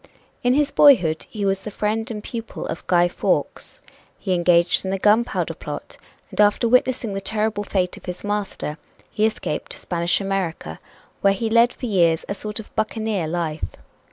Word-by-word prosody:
In 245 +1 +3
his 290 -1 +2
boyhood 180 - +5
he 210 -3 -3
was 195 0 +1
the 210 - -7
friend 215 +3 -2
and 210 -2 -5
pupil 230 -1 -6
of 165 - -6
Guy 175 -1 +4
Fawkes; 175 - -2 0.4
he 190 - -1
engaged 175 -1 +3
in 190 - -3
the 195 - 0
Gunpowder 215 +5 +2
Plot, - - -8 0.3
and - - +1
after 205 +3 +4
witnessing 250 -2 +2
the 195 - -3
terrible 215 +1 -1
fate 185 -3 -1
of - - -14
his 180 0 -6
master, 205 -7 -3 0.3
he 215 0 +2
escaped 215 -8 -4
to - - -8
Spanish 170 0 0
America, 185 - -3 0.4
where 195 0 +4
he 220 +3 -2
led 235 +1 +5
for - - -7
years 170 -7 +2
a - - -2
sort 210 +2 -5
of 220 - -11
buccaneer 215 -5 -1
life. 160 -2 -2
205 Hz, 180 wpm, -22 LUFS, 175-220 Hz, 0.4 s, boyhood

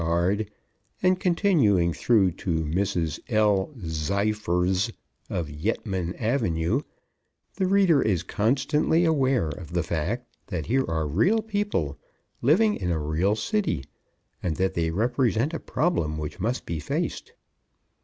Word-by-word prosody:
Aagaard_ 90 +6 +1 0.6
and 185 0 +3
continuing 145 - +3
through 100 -4 +3
to 80 -2 -2
Mrs. 85 -1 -1
L. 105 -4 +3
Zyfers 95 +3 0 0.4
of 85 -3 -2
Yettman 95 +2 -2
Ave., 110 - 0 0.7
the 190 -2 +1
reader 190 -6 +4
is 90 -6 +1
constantly 145 - +1
aware 135 - +2
of 80 +1 -8
the 90 -1 +1
fact 85 +10 -2 0.2
that 90 -6 -3
here 130 +1 +1
are 80 -1 0
real 185 - +2
people, 205 - -2 0.4
living 195 - +4
in 90 - -2
a 85 - +1
real 80 +7 +1
city, 150 - -1 0.6
and 85 -3 -1
that 95 +2 0
they 85 -2 0
represent 120 - +1
a 165 - -2
problem 80 - 0
which 75 +3 -5
must 115 +7 -1
be 85 -2 -3
faced. 75 - -3
100 Hz, 130 wpm, -26 LUFS, 85-135 Hz, 0.7 s, reader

